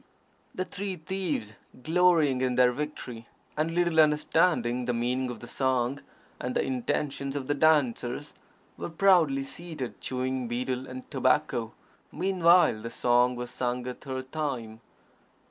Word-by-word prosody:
The 185 - -2
three 195 0 -4
thieves, 170 - -3 0.3
glorying 160 -5 +3
in 130 -1 +1
their 125 0 +5
victory, 125 -4 -6 0.3
and 160 +2 -1
little 170 -2 +2
understanding 150 -5 +3
the 125 -1 0
meaning 125 +2 -1
of 120 -3 -7
the 120 - -9
song 130 +1 0 0.4
and 125 - -4
the - - +2
intentions 135 +2 -2
of 140 -2 -3
the 145 - 0
dancers, 145 -3 +1 0.4
were - - -5
proudly 165 -6 +4
seated 155 -3 -7
chewing 130 -1 -2
betel 125 +2 -3
and 130 0 -8
tobacco. 130 -3 +1 0.4
Meanwhile 180 - +4
the 115 - -5
song 125 +1 +2
was 125 0 -5
sung 125 0 -2
a 125 - -3
third 130 0 -7
time. 125 -8 -4
130 Hz, 140 wpm, -28 LUFS, 125-155 Hz, 0.4 s, their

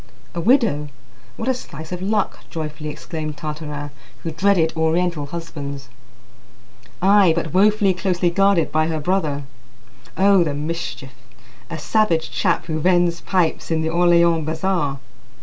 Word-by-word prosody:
"A 170 - -3
widow! 205 - +2 0.5
What 225 - -4
a 260 - +3
slice 160 - -9
of 180 0 -4
luck!" 205 +1 0
joyfully 155 -1 -5
exclaimed 155 0 -6
Tartarin, 150 -1 -5 0.3
who 165 - -3
dreaded 165 -1 +2
Oriental 160 -1 0
husbands. 140 -5 -6 1.1
"Ay, 195 -3 +6
but 165 -2 -3
woefully 205 0 +4
closely 180 -1 0
guarded 195 -2 +3
by 155 0 +2
her 160 -1 -2
brother." 150 -4 -1 0.7
"Oh, 195 -1 +5
the 150 -4 -2
mischief!" 150 -3 -5 0.6
"A - - -4
savage 165 - +1
chap 125 -1 0
who 155 -1 -2
vends 175 0 +2
pipes 180 -4 0
in 160 -1 0
the 160 - 0
Orleans 170 -1 +4
bazaar." 160 -2 -1
165 Hz, 135 wpm, -21 LUFS, 155-185 Hz, 1.1 s, Ay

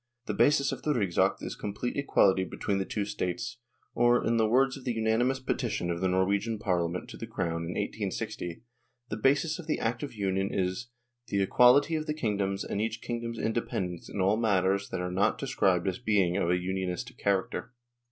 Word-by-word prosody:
The - - -2
basis 140 -2 +3
of - - -5
the 150 -1 0
Rigsakt 100 -7 +1
is - - -4
complete 105 +4 -4
equality 100 -9 +3
between 100 +1 -2
the 95 - -1
two 105 -2 -2
states, 105 +4 -3 0.4
or, 120 0 +3
in 115 0 +2
the 110 -1 +3
words 130 +4 +3
of 135 - -10
the 125 -2 -1
unanimous 115 +4 +1
petition 120 -8 -2
of 85 +1 -3
the 95 - +2
Norwegian 100 +4 +1
Parliament 90 -4 -1
to - - -9
the - - -6
Crown 85 0 -2
in 85 - -5
1860, 90 +5 -4 0.5
the 105 - -3
basis 140 +7 +2
of 165 - -9
the 155 - +1
Act 115 +1 -1
of 140 -5 -6
Union 95 -1 0
is 95 +6 -1 0.4
"the 100 -3 +1
equality 125 - +5
of 155 0 -1
the 150 - -1
kingdoms, 100 -7 -1
and 100 - -2
each 110 +1 -2
kingdom's 115 -1 -4
independence 95 -7 -2
in - - -5
all 100 +3 +3
matters 100 -3 +1
that 90 - -3
are 90 0 -3
not 95 +3 +2
described 90 -2 +1
as 95 -1 -1
being 100 -7 +2
of 90 -3 +1
a 90 - +3
unionistic 90 0 -3
character." 100 +2 -1
105 Hz, 195 wpm, -29 LUFS, 95-120 Hz, 0.5 s, equality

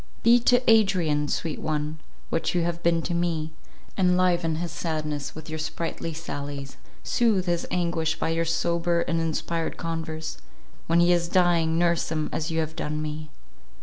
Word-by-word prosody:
Be 235 +1 +7
to 245 +1 +3
Adrian, 185 -10 +4
sweet 160 +1 -2
one, 155 0 -2 0.3
what 165 - 0
you 175 - +2
have 170 0 -2
been 170 -1 +2
to 175 - -2
me—enliven 175 +1 0
his 170 +1 -3
sadness 155 -3 -3
with 155 -1 -9
your 160 0 -4
sprightly 165 +1 -3
sallies; 145 -3 -6 0.3
sooth 220 -7 +2
his 175 -1 0
anguish 170 -3 0
by - - -1
your 165 0 +1
sober 170 +1 +1
and 165 -1 0
inspired 165 +1 -2
converse, 160 -1 -4 0.5
when 170 +1 +4
he 175 +1 +5
is 170 -1 +1
dying; 170 -3 +3
nurse 170 -1 +2
him 155 -1 -1
as 160 +2 -1
you 165 0 0
have 160 0 -4
done 150 0 -3
me." 155 0 -5
165 Hz, 160 wpm, -26 LUFS, 155-175 Hz, 0.5 s, Be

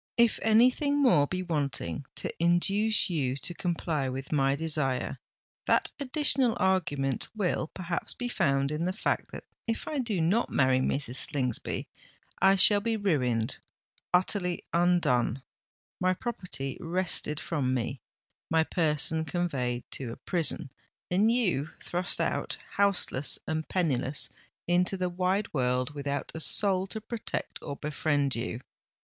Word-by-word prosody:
If 235 -1 +4
any 225 +3 +6
thing 285 +2 0
more 230 - +5
be 185 +3 -3
wanting 140 - -2
to - - -3
induce 195 +6 +3
you 140 -8 -1
to 175 - -1
comply 165 -5 -1
with 135 +1 -6
my 135 -2 +3
desire, 145 -5 -1 0.5
that - - +2
additional 270 -4 +2
argument 145 -8 +1
will, 180 -6 0
perhaps, 175 -2 -2
be 245 - -3
found 140 - +1
in 155 +3 -1
the 185 - 0
fact 210 - -1
that - - -8 0.2
if 225 - -2
I 300 -2 -2
do 225 -7 -1
not 185 +9 +2
marry 130 -1 +3
Mrs. 130 -1 -1
Slingsby, 130 -3 0 0.5
I 195 0 +6
shall 205 +2 +6
be 225 +1 0
ruined—utterly 180 - -1
undone—my 170 +1 0
property 180 - -4
wrested 170 -3 0
from 140 -6 -1
me—my 135 +6 -3
person 160 -1 0
conveyed 140 -7 -2
to 125 -4 -4
a - - -6
prison—and 180 - -1
you 180 - +1
thrust 180 +1 -1
out, - - -1
houseless 200 -8 +1
and 160 0 -3
penniless, 150 -6 0 0.4
into 180 +2 +2
the 180 -1 0
wide 185 +3 0
world, 125 0 0
without 140 -1 -3
a 160 - -5
soul 190 +2 +1
to 220 - -5
protect 220 +1 -4
or 140 - -5
befriend 145 -2 0
you. 120 +1 -4
165 Hz, 130 wpm, -29 LUFS, 135-190 Hz, 0.5 s, any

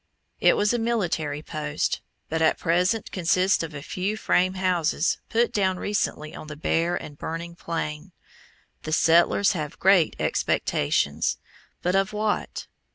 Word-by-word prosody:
It - - +4
was 205 +2 +2
a 240 - 0
military 170 -10 -1
post, 150 -2 -2 0.3
but 160 +1 -2
at 160 - +3
present 180 +6 +1
consists 185 +1 +2
of 165 -2 -6
a 140 - -7
few 195 +7 -2
frame 185 -3 +2
houses 180 -3 +1
put 235 +1 +1
down 190 -3 +1
recently 180 -6 -2
on - - -9
the 150 - -7
bare 165 +3 0
and 145 -4 -7
burning 170 +1 -5
plain. 165 0 -5 0.7
The 155 - -4
settlers 170 +5 +4
have 155 -4 -4
"great 185 -4 +4
expectations," 70 - 0 0.5
but 180 - +1
of 195 +2 +1
what? 210 0 -2
175 Hz, 145 wpm, -25 LUFS, 155-195 Hz, 0.7 s, It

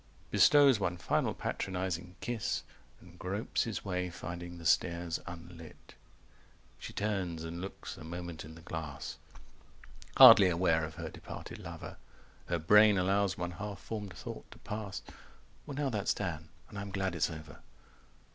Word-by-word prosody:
Bestows 140 -6 +6
one 90 -3 -1
final 85 - 0
patronising 90 -1 -3
kiss, 120 -2 -2 0.4
And 90 0 -16
gropes 100 +5 -1
his 115 -3 -4
way, 90 -1 -1
finding 85 0 -7
the 85 - -10
stairs 85 0 +2
unlit... 85 -1 -11 0.9
She - - -7
turns 95 -6 -2
and 85 +1 -5
looks 95 +1 -7
a 85 - -10
moment 85 -1 -6
in 80 +1 -10
the 85 - -13
glass, 80 -4 -6 1.0
Hardly 95 -3 +11
aware 85 -2 +2
of 80 0 -9
her - - -5
departed - - -9
lover; - - -8 0.5
250 - - -3
Her - - +3
brain 105 +5 +6
allows 100 +1 +2
one 90 -2 -3
half 100 +2 -6
formed 105 -4 -6
thought - - -8
to - - -13
pass: 105 -2 -5 0.6
"Well 140 - -6
now 145 -2 0
that's 105 -3 0
done: 80 -5 -4 0.2
and 105 - -7
I'm 100 0 -5
glad 95 -2 -1
it's 85 - +1
over." 80 -3 -9
90 Hz, 155 wpm, -32 LUFS, 85-100 Hz, 1.0 s, Hardly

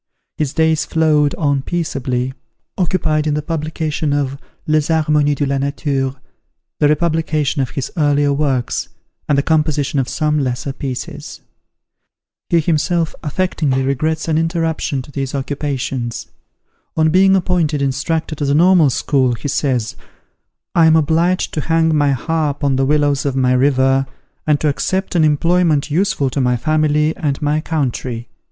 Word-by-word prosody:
His 150 -3 -1
days 160 -1 +2
flowed 150 -3 +2
on 140 -4 0
peaceably, 130 -6 -2 0.4
occupied 160 -4 0
in 150 - +1
the 150 - -2
publication 155 -1 -2
of 140 -2 -1 0.3
"Les 155 -1 +1
Harmonies 150 -2 +2
de 145 - -1
la 140 0 -1
Nature," 140 -1 -1 0.6
the 150 - +4
republication 155 -2 0
of 130 - -1
his 135 - -4
earlier 145 -3 +2
works, 135 -4 -1 0.4
and 145 - +3
the 140 - +2
composition 150 -3 +1
of 130 - -1
some 150 -1 0
lesser 135 0 -2
pieces. 130 -2 -6 1.1
He 170 -1 +3
himself 165 +1 0
affectingly 150 -4 -1
regrets 155 +4 -1
an 160 -1 +2
interruption 165 -4 -1
to 145 - -14
these 135 -1 -3
occupations. 135 -3 -3 0.7
On 160 0 +3
being 190 +2 +5
appointed 175 -5 +1
Instructor 140 +4 -1
to 145 -1 -3
the 140 +1 +1
Normal 175 -2 +5
School, 130 -1 +1
he 130 +5 -5
says, 130 -6 -1 0.8
"I 165 -1 +5
am 160 - +5
obliged 165 +4 +1
to 155 - -1
hang 160 +1 +2
my 145 -1 +3
harp 150 +2 -2
on 140 -2 +2
the 135 0 +1
willows 145 -1 +2
of 140 -2 -1
my 130 -1 +2
river, 135 0 +2 0.4
and 150 -1 +3
to 155 - +1
accept 190 +6 -1
an 170 -3 +3
employment 155 0 +2
useful 160 -5 +1
to 140 - -1
my 125 -1 +1
family 155 +2 +1
and 145 -6 -2
my 150 +1 0
country. 125 -6 -3
150 Hz, 150 wpm, -17 LUFS, 135-160 Hz, 1.1 s, being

